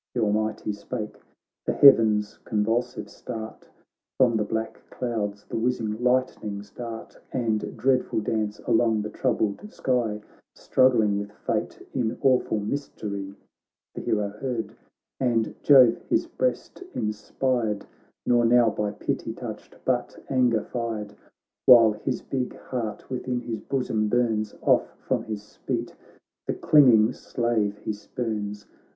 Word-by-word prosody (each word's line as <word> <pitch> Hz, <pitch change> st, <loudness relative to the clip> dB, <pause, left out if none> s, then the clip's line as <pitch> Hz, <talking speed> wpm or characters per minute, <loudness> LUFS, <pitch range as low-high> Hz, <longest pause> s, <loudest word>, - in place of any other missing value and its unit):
Th' -, -, -2 dB
Almighty 110 Hz, 0 st, 0 dB
spake 105 Hz, +1 st, -6 dB, 0.2 s
— -, -, -64 dB
the -, -, +2 dB
heavens 110 Hz, -6 st, +6 dB
con 105 Hz, -1 st, 0 dB
vulsive 120 Hz, +3 st, -1 dB
start. 110 Hz, 0 st, -8 dB, 0.5 s
From 125 Hz, -3 st, +4 dB
the 110 Hz, -, +2 dB
black 110 Hz, +1 st, -3 dB
clouds 105 Hz, -5 st, -3 dB
the -, -, -4 dB
whizzing 115 Hz, -2 st, -1 dB
lightnings 110 Hz, -5 st, 0 dB
dart 115 Hz, -1 st, -8 dB
And 115 Hz, -4 st, -1 dB
dreadful 130 Hz, -3 st, +1 dB
dance 105 Hz, -1 st, -1 dB
along 110 Hz, -2 st, +2 dB
the 105 Hz, -, -5 dB
troubled 110 Hz, -, -1 dB
sky. 120 Hz, -5 st, 0 dB, 0.4 s
Struggling 115 Hz, -6 st, +3 dB
with 100 Hz, 0 st, -6 dB
fate -, -, -3 dB
in 120 Hz, -2 st, -1 dB
awful 130 Hz, -5 st, +3 dB
mystery. 100 Hz, -4 st, -4 dB, 0.6 s
The -, -, -6 dB
hero 105 Hz, -2 st, 0 dB
heard, 115 Hz, +1 st, -4 dB, 0.4 s
and 115 Hz, -4 st, +1 dB
Jove 130 Hz, -5 st, +7 dB
his -, -, +2 dB
breast -, -, -2 dB
in 105 Hz, 0 st, -1 dB
spired. 110 Hz, -1 st, -1 dB, 0.4 s
Nor 120 Hz, -1 st, +4 dB
now 120 Hz, -1 st, +5 dB
by 105 Hz, 0 st, -2 dB
pity -, -, -3 dB
touched, -, -, -8 dB
but -, -, 0 dB
anger 125 Hz, -4 st, +3 dB
fired; 115 Hz, -4 st, -4 dB
BOOK 105 Hz, -, -19 dB
I -, -, -31 dB, 0.5 s
While 115 Hz, -3 st, +9 dB
his 115 Hz, +3 st, -3 dB
big 130 Hz, -2 st, -3 dB
heart 110 Hz, -5 st, -5 dB
within 125 Hz, -1 st, -2 dB
his 115 Hz, -3 st, -4 dB
bosom 125 Hz, -5 st, -1 dB
burns, 110 Hz, -2 st, 0 dB
Off -, -, +2 dB
from -, -, 0 dB
his 105 Hz, -1 st, -7 dB
feet -, -, -3 dB, 0.5 s
the -, -, -1 dB
clinging 125 Hz, -6 st, +5 dB
slave 110 Hz, -5 st, -1 dB
he 105 Hz, -, -4 dB
spurns. 105 Hz, -1 st, -4 dB
110 Hz, 135 wpm, -26 LUFS, 105-125 Hz, 0.6 s, While